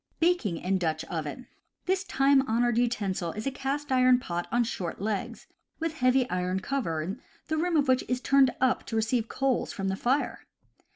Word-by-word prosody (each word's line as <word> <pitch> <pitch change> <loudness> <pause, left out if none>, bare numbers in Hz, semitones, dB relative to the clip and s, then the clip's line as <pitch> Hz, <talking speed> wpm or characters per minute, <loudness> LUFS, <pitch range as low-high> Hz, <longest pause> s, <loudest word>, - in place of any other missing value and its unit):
Baking 330 - +2
in 190 +3 0
Dutch 160 -2 -1
Oven. 160 - -4 0.2
— - - -51
This 375 +1 +1
time 275 -6 +3
honored 240 +1 +2
utensil 200 -8 -1
is 215 - -6
a 275 - 0
cast 275 +2 -3
iron 255 -1 +5
pot 175 -8 -4
on 240 0 +3
short 180 -7 -4
legs, 205 0 -3 0.3
with 325 -1 -2
heavy 255 -1 +3
iron 180 -1 -1
cover, 185 - -2 0.3
the 315 - 0
rim 340 +1 +1
of 290 -2 +2
which 255 0 +3
is 250 0 0
turned 270 0 +4
up 260 0 +2
to 225 - -4
receive 225 +1 +1
coals 265 0 0
from 195 0 -3
the 190 - -1
fire. 255 +8 -1
245 Hz, 185 wpm, -28 LUFS, 190-270 Hz, 0.3 s, iron